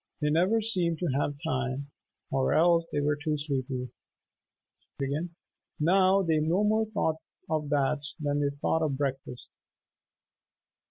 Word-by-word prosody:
They 150 -1 +1
never 185 +8 +3
seemed 180 -7 0
to 175 0 -1
have 145 0 -1
time, 135 -2 -2 0.4
or 135 -1 +1
else 165 0 +4
they 145 - 0
were 145 +1 +1
too 150 +1 -2
sleepy. 130 -3 -3 1.9
Now 190 +4 +4
they 160 -3 +2
no 165 +6 +1
more 220 +1 +2
thought 160 -7 0 0.3
of 155 -2 -1
baths 145 +1 0
than 145 -1 0
they 145 -1 +1
thought 145 +3 -1
of 145 -4 0
breakfast. 135 -3 -4
150 Hz, 130 wpm, -28 LUFS, 140-170 Hz, 1.9 s, else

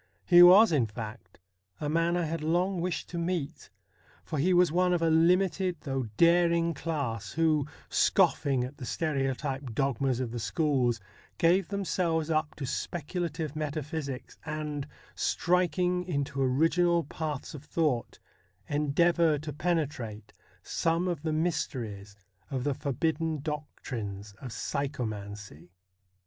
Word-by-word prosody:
He 175 -1 +8
was, 190 +5 +9
in 135 -8 +2
fact, 110 -3 -8 0.4
a 150 - -2
man 165 +3 +1
I 175 - 0
had 165 0 -3
long 175 +3 +1
wished 180 0 -2
to 170 - -4
meet, 170 -4 -3 0.5
for 155 - -4
he 175 +7 +3
was 180 -2 +5
one 180 +1 +2
of 175 - +1
a 165 - +3
limited 180 +3 +3
though 135 -3 -2
daring 170 0 +4
class, 140 -10 -3
who, 155 -3 +2 0.2
scoffing 135 -3 +2
at 130 +3 -7
the 130 - -7
stereotyped 135 -4 -2
dogmas 135 -1 0
of 125 -3 -2
the 120 - -4
schools, 125 -1 +1 0.4
give 175 +2 +3
them 200 -1 -3
selves 165 -3 0
up 155 -1 0
to 140 - -5
speculative 160 +1 -3
metaphysics, 150 -2 -4
and, 150 -2 -4 0.3
striking 180 +1 +1
into 140 -5 -2
original 165 +6 +3
paths 150 -1 -5
of 150 -2 -9
thought, 150 -5 -1 0.5
endeavour 155 +2 +2
to 150 +1 -6
penetrate 145 - -2 0.3
some 165 +2 0
of 170 -5 -2
the 160 0 -2
mysteries 120 - -2 0.3
of 130 -2 -2
the 145 0 +1
forbidden 155 +4 -1
doctrines 115 -9 -5
of 130 - -6
psychomancy. 105 - -4
155 Hz, 130 wpm, -29 LUFS, 135-170 Hz, 0.5 s, was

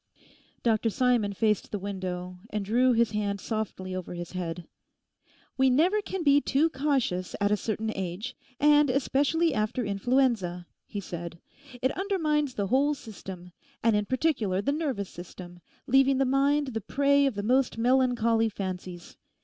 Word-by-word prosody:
Dr 225 -1 +2
Simon 245 -3 +2
faced 210 0 0
the 210 - -3
window, 185 -2 -5
and 210 -1 -3
drew 245 +5 +3
his 235 -2 +2
hand 205 -1 -2
softly 200 -4 -4
over 180 -1 -5
his 175 -1 -6
head. 175 -2 -5 0.9
'We 265 0 +5
never 345 +11 +3
can 380 -3 -4
be 285 -1 +5
too 300 +5 +2
cautious 260 - -1
at 205 0 +1
a - - +5
certain 220 +1 -3
age, 195 +6 -4 0.2
and 295 -1 +5
especially 285 +5 +1
after 215 +3 -1
influenza,' 200 -4 0 0.2
he 205 - -5
said. 170 -2 -7 0.4
'It 260 - +3
undermines 310 -8 0
the 200 - -1
whole 275 +8 +2
system, 190 -7 -10 0.3
and 225 -1 +4
in 210 0 +1
particular 255 - 0
the 270 +8 0
nervous 280 - -2
system; 175 0 -10 0.3
leaving 270 +1 +4
the 270 - +2
mind 280 +2 +2
the 225 -3 -4
prey 280 +5 +3
of 265 - -2
the 205 - -3
most 255 +2 +2
melancholy 235 -2 +2
fancies. 185 -3 -6
225 Hz, 155 wpm, -28 LUFS, 195-275 Hz, 0.9 s, We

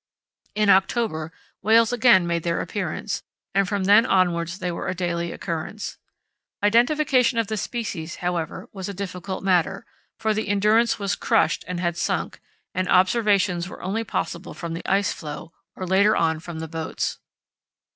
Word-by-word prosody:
In 210 -1 +4
October 190 -4 +1 0.3
whales 225 +3 +4
again 240 -7 +5
made 170 -1 0
their 170 +1 -1
appearance, 205 +1 -3 0.3
and 195 -1 +2
from 200 -2 -1
then 205 +4 +6
onwards 175 -3 +1
they 180 -2 -3
were 170 - -4
a 185 - -2
daily 170 -1 -2
occurrence. 170 +6 -5 0.6
Identification 250 +3 +3
of 230 - +2
the 220 - -3
species, 195 -7 -4
however, 175 -3 -3
was 190 -1 -5
a 200 - -6
difficult 190 0 -5
matter, 190 0 +1 0.3
for 220 -1 0
the 215 0 -2
Endurance 210 +3 +3
was 200 -2 -1
crushed 225 -2 +1
and 180 -1 -3
had 175 -1 -1
sunk, - - -2 0.3
and 185 0 -1
observations 185 -2 +3
were - - -10
only 205 +5 -1
possible 180 -4 -4
from 170 -1 -5
the 165 - -4
ice 195 0 +2
floe, 155 +1 -8 0.2
or 185 - -5
later 195 +3 +4
on 160 -1 +1
from 170 0 -8
the 160 0 -5
boats. 160 0 -3
190 Hz, 160 wpm, -24 LUFS, 170-215 Hz, 0.6 s, then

